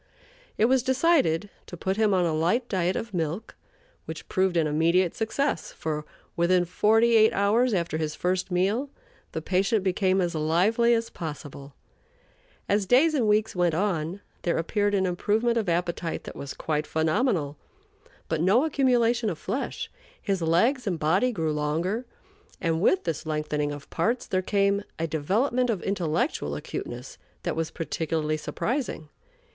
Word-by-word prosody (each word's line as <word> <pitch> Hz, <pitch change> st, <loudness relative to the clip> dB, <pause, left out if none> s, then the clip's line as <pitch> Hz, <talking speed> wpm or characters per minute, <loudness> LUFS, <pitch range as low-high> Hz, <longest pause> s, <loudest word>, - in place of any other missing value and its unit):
It 215 Hz, -, +4 dB
was 260 Hz, +2 st, +3 dB
decided 260 Hz, -, +2 dB, 0.2 s
to 175 Hz, -, -8 dB
put 190 Hz, +3 st, -1 dB
him 215 Hz, -1 st, +2 dB
on 185 Hz, -2 st, +3 dB
a 165 Hz, -, 0 dB
light 175 Hz, +11 st, +1 dB
diet 185 Hz, -1 st, 0 dB
of 225 Hz, -2 st, -4 dB
milk, 170 Hz, +5 st, -3 dB, 0.5 s
which -, -, -7 dB
proved 185 Hz, -2 st, +1 dB
an 165 Hz, -, +3 dB
immediate 165 Hz, +4 st, +2 dB
success, 275 Hz, +6 st, -1 dB
for, 150 Hz, -1 st, -4 dB, 0.3 s
within 175 Hz, +1 st, +3 dB
forty 225 Hz, +6 st, +3 dB
eight 220 Hz, 0 st, +6 dB
hours 220 Hz, +5 st, +3 dB
after 170 Hz, -5 st, -1 dB
his 155 Hz, -1 st, -2 dB
first 185 Hz, +2 st, -1 dB
meal, 200 Hz, +10 st, 0 dB, 0.4 s
the 160 Hz, -, -4 dB
patient 195 Hz, +3 st, +1 dB
became 190 Hz, 0 st, +2 dB
as 175 Hz, -1 st, 0 dB
lively 185 Hz, +10 st, +3 dB
as 230 Hz, 0 st, -2 dB
possible. 145 Hz, -3 st, -8 dB, 0.9 s
As 200 Hz, -1 st, +1 dB
days 285 Hz, -, +5 dB
and 250 Hz, -7 st, +1 dB
weeks 210 Hz, 0 st, +2 dB
went 175 Hz, -3 st, +2 dB
on, 180 Hz, -1 st, -1 dB, 0.2 s
there 170 Hz, -, 0 dB
appeared 205 Hz, +4 st, 0 dB
an 190 Hz, -1 st, +2 dB
improvement 215 Hz, +6 st, +1 dB
of 220 Hz, -6 st, 0 dB
appetite 170 Hz, -1 st, -2 dB
that -, -, -9 dB
was 140 Hz, -1 st, -7 dB
quite 150 Hz, -1 st, -2 dB
phenomenal, 160 Hz, -, 0 dB, 0.7 s
but 160 Hz, -1 st, -1 dB
no 205 Hz, -, +4 dB
accumulation 245 Hz, -6 st, +2 dB
of 170 Hz, -, -4 dB
flesh. 270 Hz, -, -4 dB, 0.3 s
His 195 Hz, -4 st, -1 dB
legs 220 Hz, -, +2 dB
and 180 Hz, -4 st, 0 dB
body 180 Hz, +11 st, +2 dB
grew 160 Hz, -8 st, -1 dB
longer; 165 Hz, +11 st, -1 dB, 0.5 s
and, 165 Hz, -3 st, 0 dB
with 370 Hz, -, +3 dB
this 160 Hz, -1 st, -3 dB
lengthening 150 Hz, -1 st, -1 dB
of 145 Hz, -1 st, -8 dB
parts, 240 Hz, +2 st, 0 dB
there 185 Hz, -, 0 dB
came 200 Hz, +1 st, +1 dB, 0.2 s
a 165 Hz, -, -1 dB
development 220 Hz, -, 0 dB
of 205 Hz, -6 st, -1 dB
intellectual 180 Hz, -, -1 dB
acuteness -, -, -6 dB, 0.2 s
that -, -, -2 dB
was 165 Hz, -1 st, -1 dB
particularly 160 Hz, -1 st, -2 dB
surprising. 230 Hz, -, -3 dB
185 Hz, 155 wpm, -26 LUFS, 160-225 Hz, 0.9 s, eight